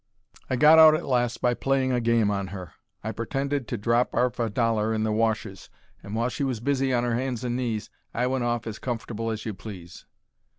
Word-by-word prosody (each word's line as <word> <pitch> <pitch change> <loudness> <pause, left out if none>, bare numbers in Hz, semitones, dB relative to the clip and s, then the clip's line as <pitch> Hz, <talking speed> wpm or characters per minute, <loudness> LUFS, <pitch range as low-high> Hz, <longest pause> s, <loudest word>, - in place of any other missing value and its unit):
I 130 - +1
got 150 +5 +7
out 155 -1 +9
at - - -3
last 120 -3 0
by 125 -1 +3
playing 135 +1 0
a 125 -1 +1
game 115 -3 +2
on 100 -1 -2
her. 90 -3 -8 0.3
I 110 - -2
pertended 135 +4 -2
to 120 - -3
drop 115 +4 +1
'arf 125 -2 +1
a 115 -1 0
dollar 110 0 +1
in 110 - 0
the 110 - 0
washus, 110 -3 -1 0.3
and 100 +2 -7
while 115 +2 0
she 140 - -3
was 130 -5 -1
busy 135 +2 0
on 120 -1 +1
'er 120 - 0
hands 125 0 -2
and 120 -1 -1
knees 115 -4 -3 0.2
I 125 - -1
went 130 0 0
off 120 -1 -1
as 110 -2 -6
comfortable 115 -2 -4
as 110 -1 -4
you 110 - -3
please. 95 -3 -10
115 Hz, 220 wpm, -26 LUFS, 110-125 Hz, 0.3 s, out